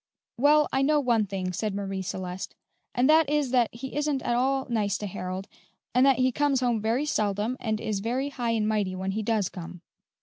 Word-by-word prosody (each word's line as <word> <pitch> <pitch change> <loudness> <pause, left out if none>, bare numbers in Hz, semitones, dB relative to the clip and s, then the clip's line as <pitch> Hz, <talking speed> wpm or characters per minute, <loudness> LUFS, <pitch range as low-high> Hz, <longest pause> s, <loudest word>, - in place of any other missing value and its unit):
"Well, 295 +4 +4
I 270 - +2
know 295 +2 +3
one 235 -6 +2
thing," 185 -2 -3
said 205 +2 -2
Marie 195 -1 -3
Celeste, 185 -1 -5 0.4
"and 250 +1 +3
that 310 -1 +5
is 295 -4 +1
that 245 -3 +3
he 260 +4 -8
isn't 295 -3 0
at 240 - 0
all 265 +2 +1
nice 210 -5 0
to 210 - -5
Harold, 185 0 -5 0.5
and 250 +1 +4
that 270 - +4
he 255 0 +3
comes 285 0 +1
home 240 -3 +1
very 230 +7 0
seldom, 210 -2 0
and 220 -2 -1
is 215 -2 -2
very 250 +7 -1
high 245 -4 -3
and 220 -2 +1
mighty 205 -4 0
when 190 +1 -2
he 215 +3 -2
does 215 -3 +1
come." 180 0 -9
230 Hz, 210 wpm, -27 LUFS, 200-265 Hz, 0.5 s, that